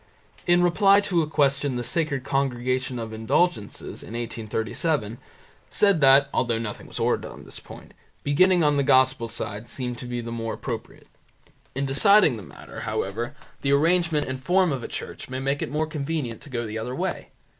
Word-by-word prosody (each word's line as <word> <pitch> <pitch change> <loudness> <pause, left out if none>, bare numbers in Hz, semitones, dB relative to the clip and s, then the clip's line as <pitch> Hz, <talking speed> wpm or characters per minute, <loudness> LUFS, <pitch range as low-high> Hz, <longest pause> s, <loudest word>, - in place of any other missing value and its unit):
In 175 0 +5
reply 195 +3 +5
to 185 -4 +1
a 155 - -1
question 140 -2 +1
the 120 - -2
Sacred 140 0 -1
Congregation 130 -1 -1
of 115 -1 -5
Indulgences, 110 - -1
in - - -10
1837, 115 +2 -2 0.5
said 200 -6 +3
that, 135 +1 +7
although 120 -2 +1
nothing 115 -2 -6
was - - -7
ordered - - 0
on - - -12
this - - -6
point, - - -13 0.3
beginning 175 +5 +4
on 150 -1 +3
the - - +3
Gospel 130 -3 +4
side 110 -1 -4
seemed 125 -2 -4
to 125 - -7
be 120 0 -3
the 115 0 -6
more 115 -1 -3
appropriate. - - -7 0.7
In 135 +1 -1
deciding 155 - +5
the 110 - -8
matter, 90 - -11
however, 115 +8 -3 0.3
the 140 0 +2
arrangement 165 0 +2
and 130 0 -4
form 180 0 +3
of 135 -3 -2
a - - -5
church - - -7
may 130 - -4
make 135 +2 -1
it - - -2
more 155 +2 0
convenient 150 -6 -3
to - - -12
go 120 -3 -3
the 110 +1 -4
other 125 +3 -4
way. - - -3
135 Hz, 185 wpm, -25 LUFS, 120-155 Hz, 0.7 s, that